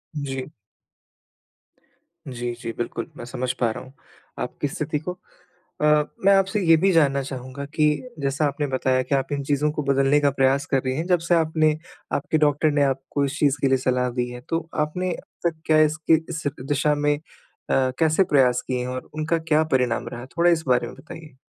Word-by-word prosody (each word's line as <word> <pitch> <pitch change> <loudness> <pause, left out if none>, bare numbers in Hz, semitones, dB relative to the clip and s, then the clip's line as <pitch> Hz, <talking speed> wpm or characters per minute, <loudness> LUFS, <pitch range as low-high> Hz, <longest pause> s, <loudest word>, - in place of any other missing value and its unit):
जी। 135 -2 -4 1.8
जी, 120 -2 -4
जी, 115 - -4
बिल्कुल। 120 -1 -3
मैं - - -7
समझ 125 +1 -2
पा 120 - +2
रहा - - -7
हूँ 130 - -15 0.5
आपकी - - -3
स्थिति 150 +2 -3
को। 170 +4 -5 0.7
अ, - - +3 0.4
मैं 200 - +7
आपसे 195 +2 +1
ये 165 - +8
भी 190 +4 +3
जानना 140 -4 +3
चाहूँगा 130 +1 -6
कि 150 -1 +4 0.3
जैसा 140 +2 0
आपने 145 +1 -2
बताया 130 -1 +1
कि 135 +2 0
आप 135 +2 -1
इन 140 -1 -2
चीज़ों 145 +2 +1
को 150 0 -3
बदलने 135 +1 +3
का 145 - +4
प्रयास 135 +1 +2
कर 135 -2 +3
रही 130 0 0
हैं, 160 - -2
जब 180 -2 +3
से 175 - +4
आपने 155 -1 +2 0.4
आपके 155 +2 0
डॉक्टर 150 0 +2
ने 145 0 +2
आपको 135 +1 0
इस 140 +2 -4
चीज़ 145 -1 +3
के 140 - +3
लिए 135 0 +3
सलाह 125 -1 0
दी 125 0 0
है। 125 - -8
तो 165 0 -1 0.2
आपने 180 +4 -3
अब 170 - -4
तक 160 -1 -16
क्या 155 -1 +4
इसके 155 +1 +3
इस 165 -1 -4 0.2
दिशा 145 +1 +2
में 145 0 +1 0.6
अ, 130 -1 +2
कैसे 160 +3 +4
प्रयास 125 -3 +4
किए 125 -1 -1
हैं 125 - -3
और 130 0 -6
उनका 155 +2 0
क्या 160 -1 +2
परिणाम 125 -3 +1
रहा? 120 +1 -7
थोड़ा 170 +6 +2
इस 160 -2 +1
बारे 125 -1 +2
में - - -10
बताइए। 150 +2 -12
145 Hz, 200 wpm, -23 LUFS, 130-155 Hz, 1.8 s, ये